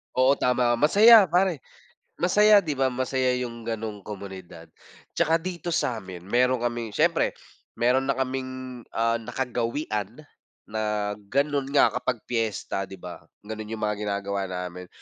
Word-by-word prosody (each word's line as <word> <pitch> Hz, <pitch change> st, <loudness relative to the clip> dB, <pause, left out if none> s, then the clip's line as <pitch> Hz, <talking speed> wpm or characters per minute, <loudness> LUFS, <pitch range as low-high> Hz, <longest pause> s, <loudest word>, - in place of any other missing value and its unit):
Oo, 130 Hz, +2 st, +4 dB
tama. 125 Hz, -1 st, +2 dB
Masaya 210 Hz, +6 st, +7 dB
pare, 175 Hz, -2 st, +2 dB, 0.6 s
masaya 210 Hz, +3 st, +5 dB
di 150 Hz, -2 st, -2 dB
ba? 130 Hz, -1 st, +1 dB
Masaya 130 Hz, 0 st, 0 dB
yung 120 Hz, -2 st, -5 dB
ganong 110 Hz, -3 st, -5 dB
komunidad. 95 Hz, -5 st, -9 dB, 0.5 s
Tsaka 165 Hz, 0 st, +2 dB
dito 175 Hz, 0 st, -5 dB
samin 95 Hz, -, -3 dB
meron 125 Hz, +3 st, +2 dB
kaming 120 Hz, -2 st, -2 dB
siyempre -, -, +1 dB, 0.4 s
meron 130 Hz, +3 st, +2 dB
na 135 Hz, -, +1 dB
kaming, 130 Hz, -1 st, -4 dB
ah, 115 Hz, 0 st, 0 dB
nakagawian 120 Hz, 0 st, -3 dB, 0.4 s
na 105 Hz, -1 st, -2 dB, 0.2 s
ganon 140 Hz, +1 st, 0 dB
nga 145 Hz, -, +4 dB
kapag -, -, -3 dB
piyesta, 110 Hz, -4 st, -2 dB
di 95 Hz, -, -9 dB
ba? 90 Hz, -1 st, -9 dB, 0.2 s
Ganun 110 Hz, 0 st, -6 dB
yung 110 Hz, -1 st, -4 dB
mga 105 Hz, -1 st, -1 dB
ginagawa 100 Hz, -1 st, -2 dB
namin. 90 Hz, 0 st, -6 dB
120 Hz, 135 wpm, -25 LUFS, 105-135 Hz, 0.6 s, Masaya